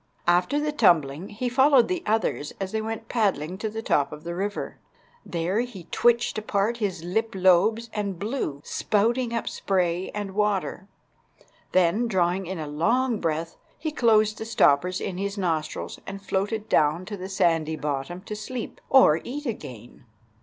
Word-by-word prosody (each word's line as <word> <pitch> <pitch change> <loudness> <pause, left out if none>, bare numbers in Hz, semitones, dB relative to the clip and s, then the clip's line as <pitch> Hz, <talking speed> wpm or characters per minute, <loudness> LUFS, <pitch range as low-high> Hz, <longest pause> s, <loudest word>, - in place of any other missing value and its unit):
After 180 +11 +3
the 300 0 -1
tumbling 170 - +2
he 225 +5 -3
followed 265 0 +5
the 365 -2 -2
others 215 -9 0
as 195 -1 -3
they 220 - -1
went 225 0 -5
paddling 190 -6 0
to 220 - -2
the 220 +1 -6
top 145 -9 +1
of 150 0 -9
the 170 0 -4
river. 200 +3 -4 0.4
There 175 +4 -1
he 235 -7 -4
twitched 240 -2 +2
apart 215 +2 0
his 190 -7 -2
lip 220 +5 -1
lobes 190 +5 +3
and 200 -3 -2
blew, 200 - -3
spouting 235 +4 0
up 230 -1 -2
spray 180 -2 0
and 205 -2 -3
water. 200 -2 -1 0.8
Then, 185 +6 +3
drawing 185 -2 +1
in 190 0 -4
a 155 - -4
long 225 - +1
breath, 165 0 -2 0.2
he 310 +1 -3
closed 215 -5 +3
the 220 - -4
stoppers 180 -4 +3
in 185 -1 -4
his 200 +1 -3
nostrils 160 -5 -2
and 195 0 -6
floated 205 +3 -2
down 155 +2 +2
to 205 - -5
the 190 0 -7
sandy 165 -4 +1
bottom 150 +4 -3
to 210 +2 -6
sleep 235 +3 -6
or 165 - +6
eat 290 +5 -6
again. 125 - -7
195 Hz, 165 wpm, -25 LUFS, 170-225 Hz, 0.8 s, or